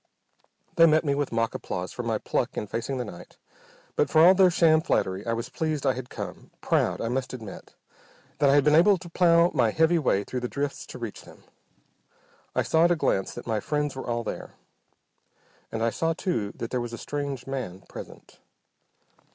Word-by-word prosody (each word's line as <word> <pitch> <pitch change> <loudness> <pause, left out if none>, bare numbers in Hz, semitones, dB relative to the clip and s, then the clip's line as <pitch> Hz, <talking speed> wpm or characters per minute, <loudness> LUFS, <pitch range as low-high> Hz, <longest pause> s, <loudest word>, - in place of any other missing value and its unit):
They 165 0 +8
met 155 +1 +3
me 140 - +2
with 145 0 -1
mock 115 0 0
applause - - -4
for - - -5
my - - -1
pluck - - -2
in - - -2
facing 115 +6 -3
the 125 - -3
night, 90 -4 -11 0.6
but - - +2
for 160 +1 +6
all 185 - +8
their 190 -1 +5
sham 160 -2 +4
flattery 95 - 0
I 115 - +1
was 115 +1 -4
pleased 155 -3 -2
I 135 - +3
had 125 0 -7
come, - - -7
proud, - - +1
I - - -1
must 130 +2 -2
admit, 110 -6 -10 0.6
that 140 - +4
I 140 - +5
had 145 - +5
been 150 +1 +4
able 190 +5 +6
to 170 0 -11
plough 170 -1 +4
my 120 -6 +3
heavy 160 +6 +3
way 100 -9 +1
through 125 - -4
the 125 - -3
drifts 140 +2 -4
to - - -9
reach 115 -4 -6
them. - - -16 1.1
I - - +2
saw 160 +1 +3
at 175 - +3
a - - +4
glance 95 - 0
that 120 - -8
my 110 -2 -1
friends 150 +4 -2
were 130 - -6
all 120 0 -1
there, - - -6 1.2
and 115 - -2
I 115 - +2
saw 165 +5 0
too 120 - -2
that 115 - -6
there 125 - -1
was 120 0 -5
a - - -5
strange 140 -2 -4
man 125 -9 -5
present. - - -12
135 Hz, 210 wpm, -26 LUFS, 115-160 Hz, 1.2 s, They